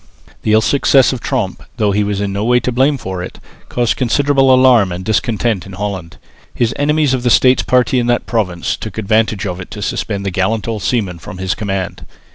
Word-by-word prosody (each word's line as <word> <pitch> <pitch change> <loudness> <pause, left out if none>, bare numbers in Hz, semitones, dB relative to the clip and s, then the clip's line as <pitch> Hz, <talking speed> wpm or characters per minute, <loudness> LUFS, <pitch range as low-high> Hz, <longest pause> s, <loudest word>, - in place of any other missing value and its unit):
The 110 - +1
ill 110 - +5
success 135 +1 +3
of 130 - -4
Tromp, 95 -3 -2 0.2
though 105 -3 +1
he 105 +1 +1
was 100 -1 -2
in 100 -1 -2
no 100 +1 -2
way 125 +2 +3
to 125 - -1
blame 135 +4 +2
for 95 -6 -5
it, 90 - -8 0.3
caused 120 -2 0
considerable 135 +1 +2
alarm 130 -7 +5
and 90 +1 -6
discontent 110 -2 0
in 95 - -10
Holland. 95 -4 -5 0.4
His 120 -1 0
enemies 150 -1 +1
of 130 - 0
the 120 - +1
States 125 +2 +4
party 125 0 +2
in 120 - -1
that 120 0 +1
province 95 -7 -1
took 110 -2 -8
advantage 110 0 0
of 90 -2 -4
it 95 - -8
to 105 0 -8
suspend 100 -1 -3
the 95 - -1
gallant 95 +5 -1
old 110 -3 -3
seaman 95 -8 -1
from 90 - -9
his 95 -1 -1
command. 95 -4 -4
110 Hz, 215 wpm, -16 LUFS, 95-125 Hz, 0.4 s, ill